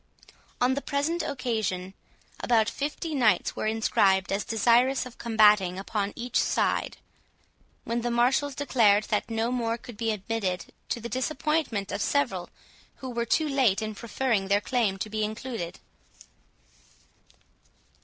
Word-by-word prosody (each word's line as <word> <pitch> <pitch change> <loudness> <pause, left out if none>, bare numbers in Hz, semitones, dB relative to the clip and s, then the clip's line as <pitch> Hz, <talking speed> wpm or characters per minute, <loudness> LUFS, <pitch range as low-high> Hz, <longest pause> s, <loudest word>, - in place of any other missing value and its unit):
On 250 +1 +3
the 280 - -2
present 305 +5 -1
occasion, 220 -10 -2 0.5
about 225 -3 +2
fifty 300 +5 -3
knights 225 -9 +2
were - - -2
inscribed 195 -3 +2
as 195 +1 0
desirous 240 +5 +3
of 250 -1 -12
combating 210 -5 +4
upon 200 +1 -2
each 245 0 -1
side, - - 0 0.9
when 235 +1 -2
the 240 - -1
marshals 255 +4 +2
declared 220 -8 +3
that 210 - 0
no 225 +1 -1
more 230 -2 -1
could 235 -2 -12
be 225 0 -1
admitted, 205 -3 -3 0.2
to - - -1
the 235 - -5
disappointment 260 -5 -1
of - - -3
several 285 0 0 0.5
who 260 -1 -7
were 235 -1 -1
too 315 +7 +2
late 265 -9 +2
in 215 0 -3
preferring 230 -2 -1
their 200 +1 +3
claim 205 -1 0
to 195 - -4
be 215 0 -2
included. 220 -4 -4
230 Hz, 140 wpm, -27 LUFS, 210-255 Hz, 0.9 s, combating